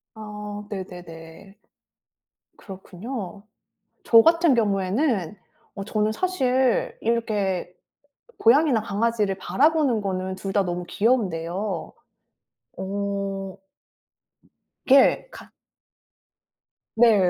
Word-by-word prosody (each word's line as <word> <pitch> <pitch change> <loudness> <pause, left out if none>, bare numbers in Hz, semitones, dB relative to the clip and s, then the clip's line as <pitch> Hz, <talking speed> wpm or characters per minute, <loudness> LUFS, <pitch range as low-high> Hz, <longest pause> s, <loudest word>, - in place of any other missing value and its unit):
아 210 -1 -7
네네네. 180 -1 -9 1.0
그렇군요. 200 +1 -8 0.6
저 230 - +7
같은 335 -1 +4
경우에는 205 - 0 0.4
어 195 - -5
저는 215 0 0
사실 260 -7 0
이렇게 210 -6 -1 0.6
고양이나 255 -1 +4
강아지를 210 -2 0
바라보는 270 - +2
거는 190 -1 -3
둘 195 +1 -5
다 200 -2 +2
너무 175 0 -3
귀여운데요. 190 -5 -1 0.9
어. 195 0 -4 1.3
그게 275 - +5
같 - - -12 1.5
네. 220 -6 +5
205 Hz, 175 characters per minute, -24 LUFS, 190-235 Hz, 1.5 s, 저